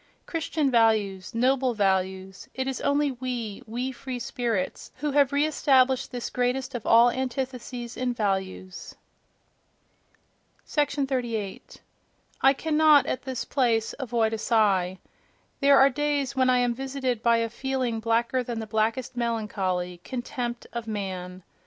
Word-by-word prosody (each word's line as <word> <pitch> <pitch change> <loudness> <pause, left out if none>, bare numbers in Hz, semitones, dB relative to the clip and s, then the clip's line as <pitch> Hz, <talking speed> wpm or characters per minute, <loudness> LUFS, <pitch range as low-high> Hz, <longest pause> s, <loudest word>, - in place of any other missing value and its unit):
—Christian 315 -4 -1
values—noble 230 +3 +2
values: 190 -1 -1
it 260 - -2
is 270 - -3
only 285 0 +2
we, 245 -5 -4
we 245 +4 -3
free 260 0 -6
spirits, 235 -6 -3
who 295 +2 -2
have 280 -1 +3
re 285 +1 +2
established 265 -4 +2
this 245 -2 -5
greatest 255 +2 -1
of 240 -3 -5
all 235 +1 +6
antitheses 250 -2 -4
in 255 -1 -1
values!... 190 -4 -3 1.7
38. 260 -8 -2 0.6
—I 270 - +6
cannot, 310 0 +4
at 255 - -2
this 260 -3 -4
place, 230 -5 +1
avoid 235 -4 0
a 220 - -2
sigh. 195 -5 +2 0.6
There 280 -1 +6
are 270 +1 +6
days 290 -1 -1
when 260 -1 +3
I 250 - +4
am 245 -1 +2
visited 260 -2 -3
by 235 0 +4
a 230 0 0
feeling 250 -1 -2
blacker 230 +3 +1
than 240 -2 -4
the 220 - -4
blackest 225 +4 -1
melancholy—contempt 225 +1 -3
of 235 -1 -5
man. 185 -3 -5
245 Hz, 130 wpm, -26 LUFS, 220-265 Hz, 1.7 s, all